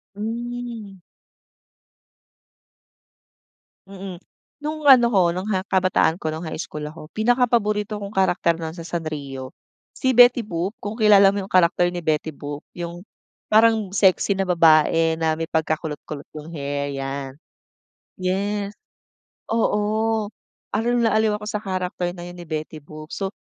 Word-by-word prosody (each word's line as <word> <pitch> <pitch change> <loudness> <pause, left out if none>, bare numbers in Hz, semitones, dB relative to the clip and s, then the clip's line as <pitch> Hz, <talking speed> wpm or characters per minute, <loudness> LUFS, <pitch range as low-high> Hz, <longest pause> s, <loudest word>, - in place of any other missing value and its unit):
Hmm. 230 -2 -5 2.9
Mm. 190 -2 -8 0.4
Nung 305 0 -4
ano 255 -4 +7
ko 180 -6 +3
nung 185 +4 -4
ha 190 -2 -1
kabataan 185 -3 +2
ko 155 - -1
nung 160 +2 -5
high 160 - -5
school 150 -2 -6
ako 155 +1 -9
pinakapaborito 220 -3 +1
kong 200 0 -7
karakter 185 -3 +2
na 160 - -3
sa 165 - -7
Sanrio 145 -6 -5 0.4
si 260 -1 0
Betty 245 -1 +6
Boop 180 +3 -3
kung 205 +1 -5
kilala 205 -3 +6
mo 200 - -2
yung 195 - -8
karakter 175 -1 +3
ni 175 - -6
Betty 160 -2 -1
Boop 145 -1 -7 0.2
yung 175 0 -6 0.5
parang 220 -2 +4
sexy 195 0 +3
na 195 - 0
babae 165 -1 +4
na 160 -1 +2
may 165 0 -4
pagkakulot-kulot 155 -2 -2 0.2
yung 150 - -10
hair, 140 0 -3
yan. 135 0 -5 0.8
Yes, 200 +2 -2 0.8
oo, 220 -1 +1 0.4
aliw 230 +3 +1
na 235 -2 +3
aliw 215 -1 +2
ako 210 - -9
sa 210 0 -3
character 185 -2 -3
na 175 - -8
yun 175 0 -10
ni 175 - -10
Betty 155 0 -5
Boop, 155 +2 -11
so, 195 - -2
185 Hz, 140 wpm, -22 LUFS, 160-215 Hz, 2.9 s, ano